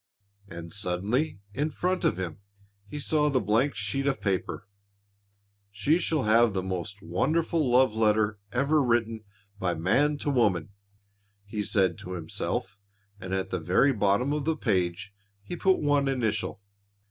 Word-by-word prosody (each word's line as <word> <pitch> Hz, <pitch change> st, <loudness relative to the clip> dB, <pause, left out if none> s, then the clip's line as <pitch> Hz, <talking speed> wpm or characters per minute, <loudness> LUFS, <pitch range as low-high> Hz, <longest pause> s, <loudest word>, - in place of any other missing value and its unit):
And 85 Hz, -2 st, -9 dB
suddenly 100 Hz, -, -1 dB
in 145 Hz, +6 st, -1 dB
front 180 Hz, +3 st, -1 dB
of -, -, +2 dB
him 90 Hz, -3 st, -5 dB, 0.5 s
he 150 Hz, -, -7 dB
saw 150 Hz, +1 st, +1 dB
the 135 Hz, -3 st, +2 dB
blank 115 Hz, +7 st, +1 dB
sheet 135 Hz, 0 st, -2 dB
of 135 Hz, -1 st, 0 dB
paper. 100 Hz, +1 st, -2 dB, 1.0 s
"She 105 Hz, -, +1 dB
shall 155 Hz, -6 st, 0 dB
have 115 Hz, 0 st, +4 dB
the 95 Hz, -1 st, -1 dB
most 95 Hz, +2 st, -5 dB
wonderful 155 Hz, -, 0 dB
love 125 Hz, -1 st, +4 dB
letter 110 Hz, -1 st, +2 dB
ever 140 Hz, +5 st, +2 dB
written 115 Hz, -3 st, 0 dB, 0.4 s
by 90 Hz, -2 st, 0 dB
man 140 Hz, -, +2 dB
to 145 Hz, -, -2 dB
woman," 100 Hz, -, +1 dB, 0.8 s
he 105 Hz, +1 st, -4 dB
said 95 Hz, -4 st, +1 dB
to 90 Hz, -, -7 dB
himself 95 Hz, +4 st, -3 dB, 0.4 s
and 95 Hz, -1 st, -7 dB
at 95 Hz, 0 st, -2 dB
the 95 Hz, -, -1 dB
very 90 Hz, -, +3 dB
bottom 105 Hz, +6 st, +1 dB
of 150 Hz, -2 st, -2 dB
the 160 Hz, 0 st, 0 dB
page, 90 Hz, -, -1 dB, 0.3 s
he 175 Hz, -, -5 dB
put 190 Hz, +2 st, +3 dB
one 145 Hz, -1 st, +2 dB
initial. 115 Hz, -6 st, -1 dB
110 Hz, 150 wpm, -27 LUFS, 95-140 Hz, 1.0 s, have